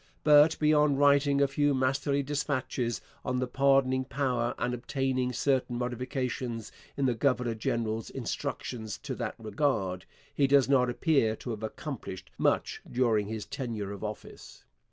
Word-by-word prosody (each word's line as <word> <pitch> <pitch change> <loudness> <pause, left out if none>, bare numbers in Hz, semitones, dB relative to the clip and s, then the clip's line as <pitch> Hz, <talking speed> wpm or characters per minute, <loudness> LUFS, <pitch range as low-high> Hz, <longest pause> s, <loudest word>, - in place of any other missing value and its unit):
But, 150 +1 +6
beyond 150 -2 +3
writing 140 0 +4
a 140 - +5
few 145 +1 +1
masterly 140 +2 +1
dispatches 135 -4 -2 0.2
on 125 0 -1
the 130 - 0
pardoning 130 0 +2
power 125 -3 -1
and 125 - -1
obtaining 130 +1 -1
certain 125 -1 0
modifications 125 -1 -3 0.3
in 140 - +1
the 125 - +3
governor 125 -1 +1
general's 110 0 -2
instructions 110 -4 -4
in - - -2
that - - -3
regard, 105 -5 -1 0.3
he 140 - +3
does 140 -1 +5
not 130 -2 +3
appear 120 -4 +2
to 120 - -6
have 110 -1 -5
accomplished 110 - -6
much - - +1
during 115 -5 +2
his 110 -1 -5
tenure 110 -6 -4
of 100 0 -7
office. 105 0 -8
130 Hz, 145 wpm, -29 LUFS, 115-140 Hz, 0.3 s, But